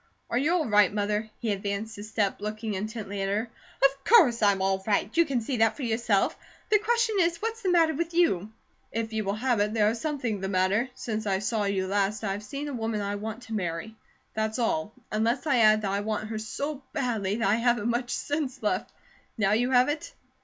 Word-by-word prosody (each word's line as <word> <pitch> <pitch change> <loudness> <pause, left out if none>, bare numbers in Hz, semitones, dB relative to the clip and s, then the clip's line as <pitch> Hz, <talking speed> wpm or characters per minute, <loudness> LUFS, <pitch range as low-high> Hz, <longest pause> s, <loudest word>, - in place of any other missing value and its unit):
"Are 235 - +1
you 295 +5 +2
all 345 -4 +2
right, 210 -4 +4
Mother?" 210 +1 -1
He 225 - -2
advanced 200 +2 -3
a - - -6
step, 210 -2 -1
looking 215 +1 -3
intently 205 0 -4
at 195 - -1
her. 220 +4 -1 0.3
"Of 275 0 +2
course 285 - +6
I'm 200 -2 +4
all 190 0 0
right! 210 0 +1
You 335 0 +5
can 270 -5 -1
see 250 +3 -2
that 225 0 +3
for 290 - -5
yourself. 225 -3 +1 0.4
The 420 - +6
question 465 0 +1
is, 340 -1 +2
what's 455 +1 -3
the 380 - 0
matter 330 -3 +4
with 335 +3 -2
you?" 215 - +2 0.4
"If 225 0 -3
you 220 -1 -1
will 200 0 -1
have 240 0 +1
it, 210 +2 0
there 210 -1 +4
is 230 - -5
something 255 -10 -2
the 190 - -2
matter. 195 +6 +1
Since 220 -4 -4
I 195 -1 +2
saw 210 +1 -1
you 195 -1 0
last 200 +2 0
I 200 - 0
have 200 +1 -3
seen 275 +8 -5
a 290 - -4
woman 225 -3 -2
I 200 0 -2
want 220 +3 -5
to 225 - -8
marry, 180 +2 -3 0.4
that's 220 +1 -1
all; 210 -6 0 0.2
unless 230 +6 0
I 280 -5 +3
add 215 -1 +5
that 195 - 0
I 200 - 0
want 215 +1 -3
her 220 -1 -3
so 280 +6 -4
badly 225 -9 -1
that 225 -2 0
I 200 - +4
haven't 235 -2 +1
much 240 +1 -1
sense 285 -4 -3
left. 200 -2 0 0.5
Now 200 -3 +2
you 240 +4 +2
have 250 -1 +5
it!" 305 +12 -3
220 Hz, 225 wpm, -27 LUFS, 205-255 Hz, 0.5 s, course